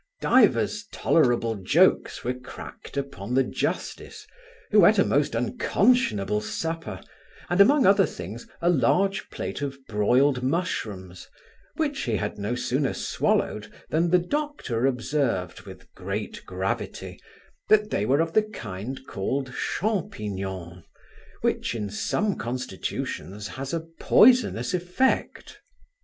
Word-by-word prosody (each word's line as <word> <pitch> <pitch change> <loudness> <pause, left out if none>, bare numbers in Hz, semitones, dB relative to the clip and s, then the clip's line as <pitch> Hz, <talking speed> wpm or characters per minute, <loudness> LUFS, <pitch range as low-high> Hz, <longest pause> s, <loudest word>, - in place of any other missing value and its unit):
Divers 210 -3 +3
tolerable 120 -6 +2
jokes 95 - +2
were 125 - -1
cracked 125 +2 -10
upon 125 -5 -4
the 135 - +5
justice, - - -4 0.5
who - - +7
eat - - +4
a - - +6
most - - +1
unconscionable 105 - +1
supper, 165 +8 -4 0.5
and, 180 +3 +5
among 275 +7 +5
other 195 0 +5
things, 100 +7 -8 0.2
a 175 - +4
large 190 +7 +1
plate 95 +8 -5
of 140 -1 -3
broiled 125 +6 +2
mushrooms, 110 - -3 0.5
which 295 -3 -1
he 115 -4 -1
had 105 0 -3
no 105 +4 -2
sooner 135 +3 -1
swallowed - - -1 0.2
than 165 +2 +2
the 180 - +5
doctor 180 - -1
observed, 125 - -1
with 95 -1 -13
great 100 +3 -5
gravity, 95 +1 -4 0.5
that 210 0 +4
they - - 0
were 135 +8 +3
of 165 0 -2
the 215 - +5
kind 130 - -7
called 130 +7 -3
champignons, 95 - -3 0.6
which - - 0
in 105 -3 -4
some 205 - 0
constitutions 105 -5 -4
has 135 0 -6
a 165 - -1 0.2
poisonous 245 -4 +4
effect. 180 +9 -1
130 Hz, 120 wpm, -25 LUFS, -, 0.6 s, who